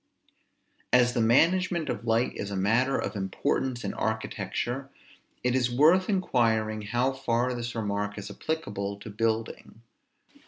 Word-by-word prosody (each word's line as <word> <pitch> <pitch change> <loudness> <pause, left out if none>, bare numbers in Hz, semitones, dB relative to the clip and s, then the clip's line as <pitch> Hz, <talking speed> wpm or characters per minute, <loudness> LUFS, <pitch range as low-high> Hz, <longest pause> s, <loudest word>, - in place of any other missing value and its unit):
As 125 0 +5
the 120 - +1
management 170 +8 +3
of 120 - -4
light 115 +2 +2
is 100 - -4
a 100 - -4
matter 115 +8 +2
of 100 - -3
importance 120 +5 -1
in - - -3
architecture, 120 +4 -3 0.5
it 125 0 +2
is 125 -1 +2
worth 160 - +4
inquiring, 115 - +1
how 120 +5 0
far 125 -1 0
this 120 -1 -4
remark 105 -1 -2
is 100 - -6
applicable 100 -11 -3
to 105 +1 -9
building. 110 +1 -3
120 Hz, 135 wpm, -28 LUFS, 110-130 Hz, 0.5 s, As